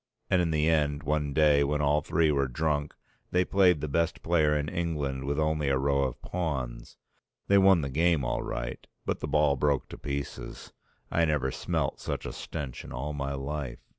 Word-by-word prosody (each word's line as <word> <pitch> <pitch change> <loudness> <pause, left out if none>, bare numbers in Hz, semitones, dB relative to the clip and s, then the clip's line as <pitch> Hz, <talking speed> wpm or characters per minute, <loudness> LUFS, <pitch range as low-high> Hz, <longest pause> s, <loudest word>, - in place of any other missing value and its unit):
And 95 - +4
in 85 - 0
the 75 -1 +1
end 75 -2 +1
one 75 0 0
day 75 -1 +4
when 75 +1 0
all 75 +1 +2
three 80 +1 +2
were 70 -2 +1
drunk 75 +3 -1 0.3
they 90 0 +2
played 90 -6 +4
the 75 - -2
best 85 +3 -1
player 75 -3 +3
in 75 0 -2
England 75 -6 -2
with 70 +1 -1
only 75 -2 +1
a 70 - +2
row 70 +1 +1
of 65 - -4
pawns. 65 -9 -4 0.5
They 100 0 +5
won 95 -3 +6
the 70 - -3
game 80 -1 +2
all - - -1
right. - - -5 0.2
But - - -1
the - - -4
ball 75 -2 +3
broke 70 0 +1
to - - -9
pieces. 70 0 -6 0.4
I 85 - +3
never 70 -4 0
smelt - - -2
such - - -4
a - - -5
stench 70 -6 -6
in - - -10
all 70 +4 -4
my 70 -1 -3
life. 70 -2 -4
75 Hz, 195 wpm, -28 LUFS, 70-80 Hz, 0.5 s, won